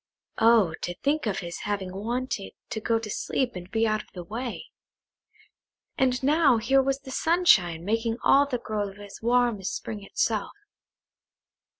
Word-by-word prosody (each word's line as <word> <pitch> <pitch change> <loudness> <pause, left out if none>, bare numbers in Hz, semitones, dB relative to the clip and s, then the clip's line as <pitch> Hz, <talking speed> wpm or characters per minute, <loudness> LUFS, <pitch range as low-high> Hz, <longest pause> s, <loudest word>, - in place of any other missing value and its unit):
Oh, 225 -7 +5
to 175 - -3
think 290 -2 +1
of 195 -2 -1
his 170 -1 -6
having 200 -4 -3
wanted 230 0 -3 0.2
to 220 - -3
go 230 +1 +1
to 225 -1 -5
sleep 245 +3 -2
and 180 0 -8
be 225 +2 +1
out 215 0 0
of - - -21
the 180 - -6
way; 230 +7 -6 1.3
and 255 -1 +1
now 290 -3 +4
here 265 +5 +3
was 270 +1 -1
the 265 - -10
sunshine 195 - +3
making 225 +2 0
all 280 +1 +5
the 255 -3 -1
grove 205 -4 -4
as 205 -1 -11
warm 240 -2 +2
as 190 - -3
spring 210 -2 -5
itself. 210 +1 -1
225 Hz, 165 wpm, -26 LUFS, 200-255 Hz, 1.3 s, Oh